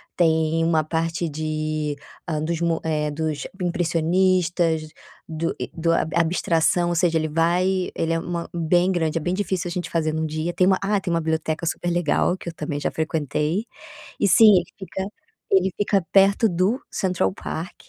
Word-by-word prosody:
tem 160 -1 +2
uma 160 -1 +2
parte 165 +2 -1
de 155 -1 -2 0.3
hã, 155 -1 -1
dos 170 +1 -2
mu 165 -1 +1
eh, 150 -1 0
dos 155 -1 -3
impressionistas, 175 -1 +1 0.4
do 165 +1 -3
e - - -4
do 165 0 0
ab 160 - 0
abstração 170 +1 +2
ou 175 - -1
seja, 170 -1 +2
ele 155 0 0
vai 180 +4 +1
ele 165 0 -1
é 165 - 0
uma 170 0 -4
bem 175 +2 +2
grande, 165 -3 0
é - - -2
bem 175 +3 -1
difícil 190 -3 -2
a - - -4
gente 175 -1 -4
fazer 155 -2 0
num 160 0 -1
dia. 155 +2 -3
Tem 185 - +3
uma, 190 - +4
ah, 200 0 +1
tem 175 - -3
uma 170 - +2
biblioteca 160 0 -2
super 175 +2 -2
legal, 175 +1 +1
que 170 - -7
eu - - -9
também 150 -2 -4
já - - -1
frequentei. 155 - -1 0.5
E 205 - +2
sim, 210 +2 +7
ele 180 - +2
fica 190 0 -5 0.4
ele 190 0 +3
fica 200 -2 +1
perto 200 +3 +5
do 190 - +1
Central 180 - 0
Park 165 +4 -6
170 Hz, 185 wpm, -23 LUFS, 160-180 Hz, 0.5 s, sim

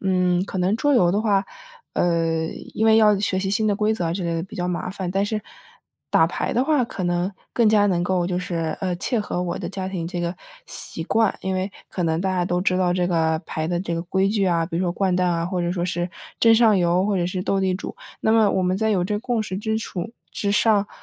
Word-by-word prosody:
嗯， 180 -1 +1
可 195 - -6
能 185 +4 +2
桌 290 +5 +2
游 180 -8 +4
的 205 - +1
话， 200 -3 +2 0.5
呃， 165 -2 +1 0.3
因 220 - +1
为 220 - +6
要 210 -2 +5
学 200 -2 0
习 190 0 -1
新 215 +2 +1
的 205 - +2
规 215 +2 +1
则 170 -6 -1
之 185 - -3
类 170 -1 -1
的 165 - -2
比 190 - -12
较 180 0 -2
麻 180 0 -2
烦， 190 -2 -4
但 195 +2 +1
是 215 0 -2 0.7
打 - - +5
牌 - - -2
的 250 - +2
话， 295 -3 +2
可 190 -5 -5
能 175 +2 0 0.2
更 230 -3 +3
加 210 -1 +4
能 175 -3 +1
够 180 -1 0
就 180 0 -1
是， 165 -3 -2
呃， 185 -2 -1
切 225 +6 -1
合 205 -3 -3
我 175 -1 -3
的 - - -4
家 190 -1 -4
庭 175 -3 -4
这 175 0 -4
个 170 +1 -2 0.3
习 - - -6
惯。 225 -3 +2
因 190 0 -2
为 185 +2 -2 0.2
可 180 - -3
能 160 -1 0
大 190 - 0
家 180 -1 +1
都 175 0 0
知 185 -1 +1
道 180 -1 +2
这 180 -1 +1
个 160 -2 +1
牌 155 +1 -3
的 175 - 0
这 170 -2 -3
个 165 - -2
规 190 +2 +1
矩 205 -1 +1
啊， 170 -3 +1
比 165 - -4
如 175 - 0
说 175 -2 0
掼 190 -1 0
蛋 180 0 +2
啊， 170 0 0
或 180 -1 -2
者 175 - 0
说 175 -1 -1
是 175 0 -2 0.3
争 230 - +6
上 225 -2 +5
游 180 +2 +2
或 205 -2 +1
者 175 - +1
是 180 0 -3
斗 195 -1 +1
地 190 -1 +1
主。 190 - -6 0.3
那 220 - +2
么 220 -2 +5
我 190 - +1
们 185 0 +1
在 220 +2 +1
有 185 -4 +1
这 210 - -1
个 205 - -2
共 240 -1 -1
识 200 -3 -4
基 220 +2 -1
础 205 -1 -5 0.2
之 200 - -1
上， 205 -1 +3
185 Hz, 285 characters per minute, -23 LUFS, 175-205 Hz, 0.7 s, 为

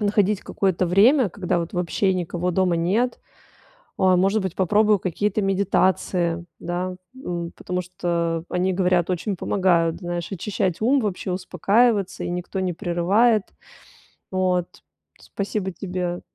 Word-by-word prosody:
находить 205 -1 +2
какое-то 185 -2 0
время, 220 - +5
когда 180 -2 -1
вот 165 - -5
вообще 180 +2 +1
никого 180 0 -2
дома 180 -1 +2
нет. 205 +9 0 0.8
А, 185 -1 +4
может 195 +4 +2
быть, 190 -2 -3
попробую 210 +2 +3
какие-то 205 +4 -1
медитации, 185 -3 +1 0.2
да, 180 +1 -3 0.2
м, 175 -9 -5
потому 180 0 -3
что 170 -2 -2
они, 185 +1 +1
говорят, 180 -2 +2
очень 185 +2 -2
помогают, 170 -4 +1
знаешь, 175 -1 -4
очищать 190 -1 -2
ум, 265 +5 +3
вообще, 195 -4 -2
успокаиваться, 195 +3 +1
и - - -3
никто 180 +2 -4
не 185 -2 -1
прерывает. 200 +5 +2 0.9
Вот. 185 -2 +1 0.5
Спасибо 200 -1 -3
тебе. 180 0 -4
185 Hz, 130 wpm, -23 LUFS, 175-200 Hz, 0.9 s, время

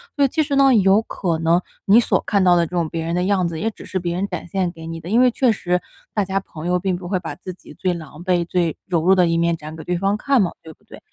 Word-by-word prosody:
所 285 -3 +3
以 - - +4
其 310 - 0
实 285 -1 -2
呢， 275 -1 +5
有 195 0 +4
可 175 -6 -2
能 165 +2 +2 0.2
你 205 +4 +6
所 240 - +2
看 200 -2 +2
到 180 -1 +5
的 170 -1 +3
这 - - -9
种 170 -3 -1
别 165 0 -4
人 165 - -2
的 180 - 0
样 190 -2 +1
子， 165 -1 -5
也 225 - 0
只 220 - -12
是 185 - -3
别 175 -1 -3
人 190 +3 -1
展 180 -3 -6
现 185 0 -1
给 165 -1 -10
你 165 0 -6
的， 165 - -9
因 225 +4 +3
为 255 - +6
确 250 0 +2
实 180 -4 0 0.4
大 205 -2 +1
家 195 +1 -1
朋 165 -4 -10
友 180 0 +1
并 185 0 -1
不 175 0 -8
会 185 0 0
把 170 - -6
自 185 0 -8
己 175 - -15
最 185 -1 -1
狼 160 -1 -9
狈、 180 -2 +1
最 170 -2 0
柔 175 -4 +1
弱 185 +3 +5
的 180 -2 +4
一 165 0 +1
面 170 0 +2
展 155 0 -9
给 160 - -9
对 180 - -2
方 195 +2 +1
看 270 +2 +2
嘛， 180 - +1
对 160 - -11
不 - - -33
对？ - - -13
180 Hz, 335 characters per minute, -21 LUFS, 170-195 Hz, 0.4 s, 你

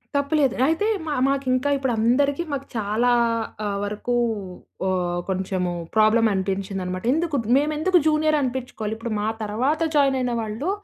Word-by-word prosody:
తప్పు 280 +2 0
లేదు. 275 -4 +3
అయితే 325 +6 +1 0.2
మ - - -4 0.2
మాకింకా 270 0 +1
ఇప్పుడు 265 -3 -1
అందరికి 280 +8 +2
మాకు 275 -1 -3
చాలా 220 +3 +1 0.6
ఆహ్, 200 -1 -1
వరకు 210 +4 -3 0.7
ఆహ్, 180 -1 0
కొంచెము 185 -1 -1 0.2
ప్రాబ్లమ్ 220 +1 +4
అనిపించిందన్నమాట. 190 -1 -3
ఎందుకు 325 -1 -1 0.2
మేమెందుకు 305 +5 +2
జూనియర్ 310 0 +3
అనిపించుకోవాలి. 245 -4 -3
ఇప్పుడు 230 0 -5
మా 210 - -1 0.2
తరువాత 255 +10 0
జాయిన్ 275 -2 +4
అయిన 250 -1 -1
వాళ్ళు 220 - -3
245 Hz, 140 wpm, -23 LUFS, 205-285 Hz, 0.7 s, ప్రాబ్లమ్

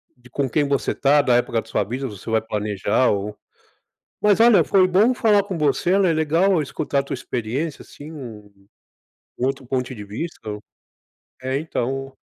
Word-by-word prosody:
de 125 0 -19
com 140 0 -1
quem 145 0 +1
você 140 -1 0
está, 145 +1 +3
da 125 -4 +2
época 120 -2 +1
da - - -19
sua 110 - 0
vida. 130 +6 -4
Você 105 0 -9
vai 110 0 +2
planejar, 105 +2 0
ou 105 +1 -2 0.9
mas 210 -1 +4
olha, 230 -2 +6
foi 190 -2 +4
bom 205 +7 +4
falar 215 -5 +3
com 190 -4 -5
você, 155 +5 +2
né, 190 -3 +3
é - - +1
legal 165 +3 +2
escutar 145 0 -2
a - - -1
tua 140 - -6
experiência, 130 +6 -3
assim, 150 +2 -12
um 105 -8 -11 0.7
um 125 - +1
outro 135 -2 -3
ponto 130 0 -2
de 105 - -8
vista, 115 +12 -6
o 105 0 -5 0.8
É, 130 +1 -1
então 135 -3 -3
135 Hz, 185 wpm, -22 LUFS, 115-165 Hz, 0.9 s, olha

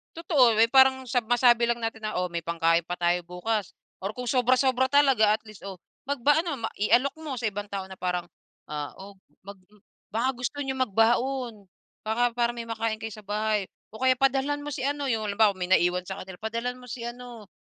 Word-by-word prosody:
Totoo, 285 -8 +4
may 225 +1 +4
parang 265 -1 +5
sab 245 -2 0
masabi 240 0 +4
lang 235 0 -1
natin 225 -1 -4
na, 215 - -3
"Oh, 180 0 -1
may 170 -1 -5
pangkain 165 0 +2
pa 175 - -4
tayo 175 0 0
bukas." 185 +3 -3 0.2
Or 195 +3 -5
kung 250 0 -5
sobra-sobra 255 +1 +3
talaga, 265 -6 +4
at 215 - -2
least, 215 -2 -13
oh, 190 -3 -8 0.2
magba 285 +2 +2
ano, 285 -8 -4
ma - - -2
ialok 245 +6 +2
mo 310 -3 -6
sa 235 -4 -1
ibang 205 0 -5
tao 195 -2 -6
na 190 - -10
parang, 180 -1 -2 0.4
ah, 150 -1 -5
"Oh, 195 0 -12 0.2
mag 200 +1 -11 0.6
baka 235 +4 +1
gusto 250 +4 -3
niyong 265 -1 -3
magbaon. 235 +1 0 0.4
Baka 240 +3 +2
para 240 0 +1
may 235 -1 -7
makain 225 -1 -2
kayo 225 - -4
sa 215 0 -12
bahay. 210 0 0 0.2
O 220 - -11
kaya 260 +2 +4
padalhan 270 +2 +1
mo 290 - -6
si 265 -2 -4
ano." 285 -1 -1
'Yong 220 -2 0
halimbawa, 205 -2 +3
may 180 - -2
naiwan 180 0 +2
sa 190 +1 -6
kanila. 185 -1 -10
"Padalhan 230 +3 -3
mo 250 - -13
si 240 0 -7
ano, 240 -3 -8
225 Hz, 210 wpm, -26 LUFS, 200-255 Hz, 0.6 s, parang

